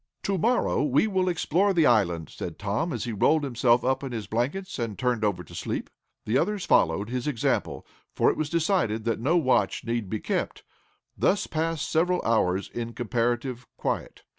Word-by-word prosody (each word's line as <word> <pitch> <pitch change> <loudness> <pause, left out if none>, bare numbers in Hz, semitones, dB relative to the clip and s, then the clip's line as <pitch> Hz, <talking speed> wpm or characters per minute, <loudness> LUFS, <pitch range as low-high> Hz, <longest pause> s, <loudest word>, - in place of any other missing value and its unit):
"To 200 - 0
morrow 240 - +2
we 145 +4 +3
will 190 -3 +1
explore 180 +3 +1
the 165 -3 +4
island," 90 - +2
said - - -6
Tom, 105 - -1
as 120 -6 -3
he 120 - -3
rolled 150 +9 +2
himself 120 -2 +2
up 130 +1 +1
in 135 - -4
his 110 -3 -4
blankets 130 - -2
and 115 -4 -3
turned 125 -4 0
over 100 -4 0
to 85 - -15
sleep. 85 - -4 0.3
The 115 +5 +2
others 200 +3 -1
followed 100 +7 +2
his 125 +2 -2
example, 130 -7 -1 0.3
for - - +4
it - - -5
was 155 -1 -2
decided 160 - +1
that 115 -1 -1
no 150 +9 +2
watch 130 -6 +1
need 115 -4 -2
be 110 - -2
kept. - - -3 0.5
Thus 205 +1 +2
passed 160 -1 -2
several 180 +3 +2
hours 100 -4 +1
in 115 0 -5
comparative 120 +1 -2
quiet. - - -3
125 Hz, 185 wpm, -26 LUFS, 110-165 Hz, 0.5 s, the